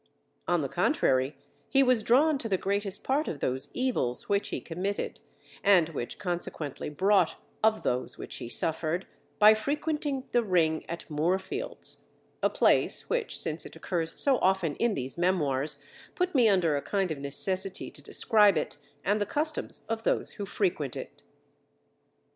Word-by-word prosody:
On - - +2
the - - -1
contrary, 130 +2 +1 0.3
he 275 0 +5
was 250 -3 +3
drawn 280 +6 +4
to 225 - -2
the 190 - +2
greatest 200 +1 -2
part 285 +4 +1
of 145 - -4
those 130 0 -1
evils 250 - -1
which 200 -1 0
he - - -3
committed, 185 +4 -3 0.4
and 185 -5 +5
which 130 -7 -5
consequently 170 -7 -3
brought 190 +7 +3 0.3
of 220 0 +3
those 125 +1 -1
which - - -6
he 115 - -7
suffered, 160 +6 -1 0.3
by 210 +1 +8
frequenting 285 +3 -2
the 240 - +3
ring 170 -7 +2
at 170 - -6
Moorfields 190 - -2 0.4
a - - +3
place - - +2
which 480 -2 -1
since 160 +1 -1
it - - -11
occurs 165 0 -2
so 275 -3 +3
often 185 -5 +2
in 235 -3 +1
these 130 +5 -5
memoirs, 150 -5 +1 0.4
put 360 0 0
me 245 -6 +5
under 175 -6 +3
a 140 - -1
kind 195 -1 -1
of 150 - -4
necessity 185 +7 -3
to - - -8
describe 210 -5 +4
it, 145 -2 -2 0.3
and 205 +1 +2
the 205 - 0
customs 305 +5 -2
of 225 0 -2
those - - +1
who 200 -2 -6
frequent 170 - -1
it. - - -8
190 Hz, 160 wpm, -29 LUFS, 160-225 Hz, 0.4 s, by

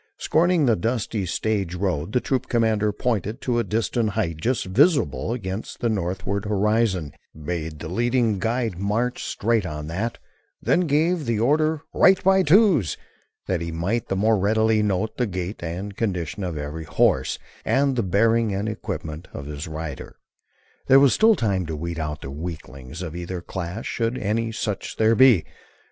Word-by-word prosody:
Scorning 170 -1 +2
the 115 -3 +4
dusty 110 -1 -2
stage 100 -1 -1
road, 90 -3 -2
the 125 - +2
troop 130 +1 -1
commander 110 -3 +2
pointed 110 +1 -2
to 120 -2 0
a - - +1
distant 115 +1 0
height 100 -7 -2
just 120 +9 -1
visible 140 - +2
against 100 -3 -5
the 120 - 0
northward 95 0 -2
horizon, 105 -6 +1 0.3
bade 80 0 -4
the 75 - -7
leading 115 +2 +1
guide 115 -4 -1
march 115 +5 -1
straight 115 0 0
on 75 -3 -5
that; 105 +8 -3 0.4
then 180 -1 +2
gave 155 +1 +1
the 115 -2 0
order 155 +5 +2
"Right 190 0 +5
by 190 0 +5
Twos," 165 - +4 0.5
that 90 -3 -1
he 85 0 -4
might 95 +9 -1
the 95 - -1
more 110 +2 +2
readily 110 +2 +2
note 105 +1 -1
the 125 - +1
gait 90 +1 -5
and 90 +4 -5
condition 95 -4 -2
of 85 -4 -3
every 75 +2 -5
horse 65 -3 +2 0.3
and 135 0 +2
the 120 - +1
bearing 110 +2 +2
and 100 +2 -2
equipment 80 -6 -5
of 70 - -6
his 75 +1 -6
rider. 80 -3 -6 0.7
There 135 - +8
was 140 -2 +5
still 220 0 +5
time 100 - 0
to 80 - -3
weed 85 +2 -4
out 75 -1 -4
weaklings 75 0 -7
of 85 -2 -6
either 90 +1 -4
class 90 +4 -5
should 115 +1 -1
any 115 +1 -1
such 105 -2 -4
there 110 0 +4
be. 120 -8 +6
105 Hz, 165 wpm, -23 LUFS, 85-120 Hz, 0.7 s, There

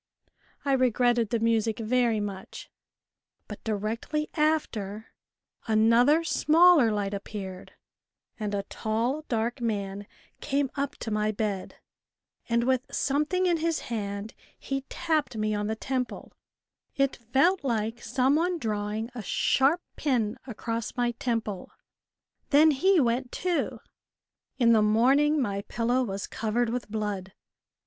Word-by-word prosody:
I 280 - +1
regretted 245 -3 +2
the 235 - +1
music 225 -1 +1
very 230 -1 +1
much. 200 -2 -7 0.8
But 210 - -9
directly 225 +8 -2
after 225 - -1 0.5
another 230 +8 +4
smaller 330 -6 +5
light 205 -1 -1
appeared, 195 -2 -7 0.7
and 210 -1 -2
a 200 - -1
tall 230 +9 -2
dark 235 +2 -1
man 200 -3 -3 0.3
came 275 -1 -1
up 280 -1 -3
to 225 - -4
my 215 0 +1
bed, 205 -3 -3 0.7
and 235 0 +2
with 260 +1 +1
some 285 +2 0
thing 370 +1 +1
in 350 -2 +3
his 330 0 0 0.2
hand 200 0 -4 0.2
he 270 0 -4
tapped 310 -8 -1
me 215 0 0
on 205 0 -1
the 220 - -1
temple; 255 +2 -4 0.6
it 275 -1 +1
felt 270 +10 +2
like 230 -2 -1
some 260 +5 +2
one 350 +2 0
drawing 215 -2 -3
a 245 - -6
sharp 275 - +2 0.2
pin 240 -7 0
across 230 0 -4
my 240 -1 +1
temple: 225 -5 -3 0.8
then 310 +2 +6
he 370 +6 +3
went 245 -1 0
too. 360 -2 -1 0.8
In 235 -3 +5
the 220 - +5
morning 265 +8 +4
my 200 -6 -1
pillow 235 +5 0
was 195 -5 -3
covered 230 +2 -1
with 245 -2 -4
blood. 205 -3 -3
235 Hz, 130 wpm, -27 LUFS, 215-275 Hz, 0.8 s, then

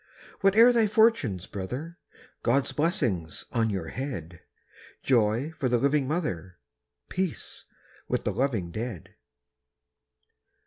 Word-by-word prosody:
Whate'er 220 +5 +6
thy 230 -2 +4
fortunes, 210 - +3
brother! 125 - -6 0.5
God's 135 +3 +2
blessing 120 - 0 0.2
on 115 -1 +1
your 95 -6 -3
head; 90 - -5 0.6
Joy 120 +3 +2
for 150 -5 -2
the 120 - +3
living 140 +1 +2
mother, 95 - -3 0.5
Peace 185 - -4 0.4
with - - -1
the - - -1
loving 115 -11 -1
dead. 110 - -6
130 Hz, 105 wpm, -27 LUFS, 95-160 Hz, 0.6 s, Whate'er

